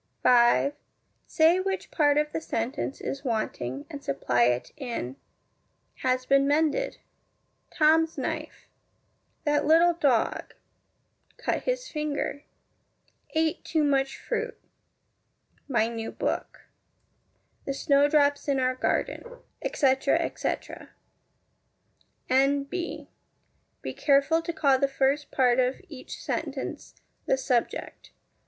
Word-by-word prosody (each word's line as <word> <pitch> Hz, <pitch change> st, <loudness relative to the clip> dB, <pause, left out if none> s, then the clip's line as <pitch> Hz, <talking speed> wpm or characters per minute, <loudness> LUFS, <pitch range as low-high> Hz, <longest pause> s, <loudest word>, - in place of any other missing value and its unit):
5. 245 Hz, +3 st, +5 dB, 0.5 s
Say 325 Hz, +3 st, +4 dB
which 385 Hz, 0 st, -3 dB
part 290 Hz, -2 st, +3 dB
of 300 Hz, 0 st, +1 dB
the 325 Hz, -, -3 dB
sentence 265 Hz, 0 st, -3 dB
is 275 Hz, -, -4 dB
wanting, 140 Hz, -, -3 dB
and 285 Hz, -1 st, -9 dB
supply 125 Hz, -3 st, +1 dB
it 125 Hz, 0 st, 0 dB
in 235 Hz, -, -5 dB, 0.8 s
Has 255 Hz, 0 st, 0 dB
been 275 Hz, +1 st, +4 dB
mended 315 Hz, +12 st, +1 dB, 0.7 s
Tom's 320 Hz, +1 st, +3 dB
knife -, -, -5 dB, 0.8 s
That 295 Hz, -1 st, +1 dB
little 335 Hz, +2 st, +6 dB
dog 280 Hz, -9 st, 0 dB, 0.8 s
Cut -, -, -2 dB
his -, -, -1 dB
finger 300 Hz, -1 st, -3 dB, 0.9 s
Ate 320 Hz, 0 st, +1 dB
too 315 Hz, -2 st, 0 dB
much 270 Hz, -2 st, +1 dB
fruit 470 Hz, 0 st, -4 dB, 1.1 s
My 235 Hz, -5 st, +2 dB
new 225 Hz, -1 st, -5 dB
book -, -, -3 dB, 1.0 s
The 275 Hz, -, -2 dB
snowdrops 285 Hz, 0 st, +3 dB
in 275 Hz, -2 st, +1 dB
our 255 Hz, 0 st, +2 dB
garden, 255 Hz, -, -1 dB, 0.4 s
etc., 265 Hz, -1 st, +2 dB
etc. -, -, -4 dB, 1.4 s
N.B. 280 Hz, +6 st, 0 dB, 0.8 s
Be -, -, -4 dB
careful 280 Hz, +3 st, +3 dB
to 340 Hz, -, -3 dB
call 275 Hz, -5 st, +2 dB
the 275 Hz, -, +3 dB
first 275 Hz, +2 st, 0 dB
part 250 Hz, -2 st, +3 dB
of 255 Hz, +1 st, +1 dB
each 275 Hz, -5 st, -9 dB
sentence -, -, -4 dB, 0.3 s
the 265 Hz, -, +3 dB
subject. 250 Hz, -3 st, -2 dB
280 Hz, 105 wpm, -27 LUFS, 255-310 Hz, 1.4 s, little